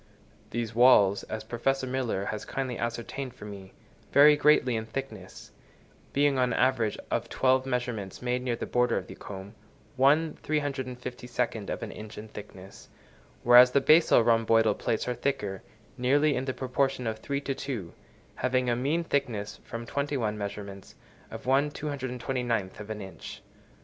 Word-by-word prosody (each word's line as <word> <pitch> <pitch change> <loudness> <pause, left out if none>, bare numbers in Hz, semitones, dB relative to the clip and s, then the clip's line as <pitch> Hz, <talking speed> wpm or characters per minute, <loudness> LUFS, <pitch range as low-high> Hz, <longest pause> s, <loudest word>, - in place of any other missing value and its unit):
These 115 -1 -3
walls, 105 -5 +6
as 110 0 -5
Professor 130 +4 -1
Miller 125 -6 -2
has 105 0 -4
kindly 130 -2 -3
ascertained 120 +3 -4
for 115 - -10
me, 100 -2 -9 0.4
vary 150 +1 +7
greatly 145 -4 +4
in 110 0 -3
thickness; 110 -6 -7 0.6
being, 140 -1 +2
on 125 -2 +2
an - - -1
average 120 -5 +2
of - - -1
twelve 130 0 +2
measurements 120 -6 -3
made 125 0 -1
near 125 -2 -1
the - - -5
border 125 -1 +1
of - - -3
the - - -10
comb, 100 +1 -9 0.5
1/353 130 -6 -1
of - - -4
an 110 - -5
inch 110 0 -10
in 110 - -7
thickness; 95 -2 -11 0.5
whereas 120 +1 +8
the 140 - +3
basal 155 -3 +5
rhomboidal 115 -1 +4
plates 110 +3 -2
are 125 - 0
thicker, 120 -6 -2 0.4
nearly 145 +4 +3
in 130 - -2
the 130 - -2
proportion 130 0 -1
of 110 -1 -2
three 140 +4 -2
to 140 - -2
two, 120 -11 -5 0.4
having 125 -1 +1
a - - +2
mean 145 +8 0
thickness, 125 -10 -2
from 115 0 -7
twenty 140 +3 -2
one 110 -4 -1
measurements, 100 -1 -7 0.3
of - - -8
1/229 130 -6 -1
of 105 0 -8
an 110 -1 -5
inch. 95 - -10
125 Hz, 155 wpm, -28 LUFS, 110-135 Hz, 0.6 s, whereas